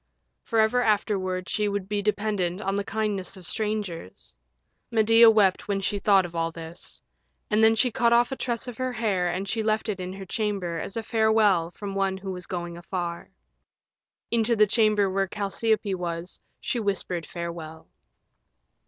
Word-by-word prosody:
Forever 225 +2 +3
afterward 190 -4 0
she 210 -1 0
would 200 -2 -2
be 205 0 -1
dependent 205 -3 -1
on 195 -1 -1
the 200 - 0
kindness 205 -3 -2
of 185 - -9
strangers. 210 - -4 0.5
Medea 225 0 +6
wept 205 -4 +3
when 200 -1 0
she 200 +1 -1
thought 195 -2 +4
of 170 -1 -9
all 165 0 0
this. 165 +1 -6 0.5
And 215 +1 +4
then 225 0 +6
she 245 +2 +2
cut 235 +1 +2
off 240 +2 +4
a - - -1
tress 240 -1 -3
of 245 - -7
her 255 -1 -1
hair 200 -6 0
and 185 +3 -3
she 220 +3 -1
left 215 0 0
it 200 -3 -2
in 185 0 -5
her 195 0 -8
chamber 195 -5 -2
as 195 - -5
a 225 - -2
farewell 220 -6 +3
from 195 +2 -7
one 195 -1 0
who 190 0 -6
was 180 -1 -7
going 175 -1 -5
afar. 175 -1 -4 1.0
Into 235 0 +2
the 215 -1 +6
chamber 210 -1 +3
where 195 0 0
Chalciope 205 +1 -1
was 175 -1 -4 0.2
she 245 - -2
whispered 195 -5 -2
farewell. 170 -2 -7
200 Hz, 170 wpm, -26 LUFS, 180-220 Hz, 1.0 s, Medea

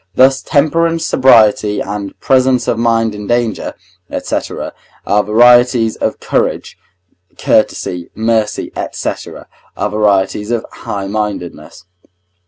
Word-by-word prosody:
Thus 135 +1 +4
temperance, 165 +3 +1
sobriety, 110 -5 +4
and 100 0 -5
presence 130 -1 +2
of 115 - 0
mind 115 -1 +1
in 105 -1 -8
danger, 120 -3 -1 0.3
&c., - - -3 0.7
are 105 +1 +2
varieties 120 +1 +4
of - - -2
courage; - - -2 0.6
courtesy, 90 -1 0
mercy, 110 -1 -1 0.2
&c., - - -2 0.7
are 105 - -1
varieties 105 0 +1
of 120 -2 -1
highmindedness. 100 -3 -5
110 Hz, 100 wpm, -14 LUFS, 105-125 Hz, 0.7 s, Thus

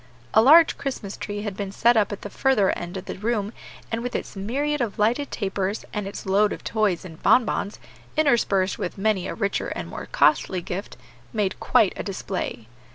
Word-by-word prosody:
A 220 - +7
large 315 +7 +7
Christmas 235 -8 -4
tree 205 0 -5
had 205 -3 -4
been 200 -1 -4
set 235 +4 +4
up 215 -1 +3
at 205 - -6
the 205 - -5
further 255 -8 +3
end 175 +2 -5
of 185 - -7
the - - -6
room, 215 -1 -1 0.4
and, 225 0 -1
with 245 +1 -4
its - - -4
myriad 275 +9 -1
of 225 -4 -2
lighted 235 +7 +1
tapers, 195 0 -2
and 210 -2 -3
its 200 - -7
load 200 +2 +3
of - - -6
toys 210 -6 0
and 160 -3 -11
bonbons, 220 -4 +2 0.4
interspersed 225 -10 +2
with 180 - -4
many 195 -2 +1
a - - -4
richer 200 -3 -1
and - - -5
more - - -7
costly 190 - +2
gift, 190 +4 -5 0.4
made 205 -3 -1
quite 205 -5 +3
a - - -4
display. 190 - -4
205 Hz, 195 wpm, -24 LUFS, 195-235 Hz, 0.4 s, A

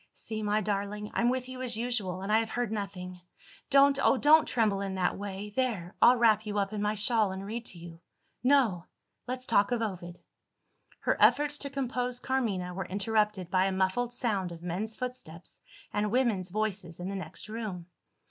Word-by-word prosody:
"See, 220 -1 -5
my 210 0 +1
darling, 210 +1 -3
I'm 235 - +2
with 255 0 -1
you 255 0 -7
as 240 -3 -2
usual; 210 -6 -2
and 200 - -2
I 220 - +5
have 225 -1 -2
heard 240 -2 -2
nothing. 185 -4 -5 0.5
Don't, 275 0 +5
oh, 270 - +5
don't 305 +4 +6
tremble 215 -5 +1
in 195 -1 -3
that 185 - +1
way! 200 +1 -6
There 220 -9 -1
I'll 245 - +8
wrap 220 -2 +4
you 210 0 -2
up 200 +1 0
in 210 - -2
my 210 +1 0
shawl, 215 -1 +2
and 190 +1 -6
read 230 +3 -5
to 180 - -10
you. 165 -1 -11 0.4
No! 250 -10 +3 0.4
let's 255 0 -3
talk 200 -2 +3
of 235 -2 +1
Ovid." 180 -4 -5 0.8
Her - - 0
efforts 295 0 +4
to 280 - -3
compose 250 -2 -2
Carmina 215 -10 -1
were 190 +1 -4
interrupted 205 -1 0
by 185 0 +3
a 195 - +1
muffled 190 +6 0
sound 210 -7 -1
of 170 0 -10
men's 195 +6 -3
footsteps 250 -10 -7 0.3
and 210 0 0
women's 220 -6 +1
voices 195 -4 -3
in 180 - -4
the 200 - -4
next 190 - -7
room. 215 -6 -5
210 Hz, 190 wpm, -29 LUFS, 190-245 Hz, 0.8 s, I'll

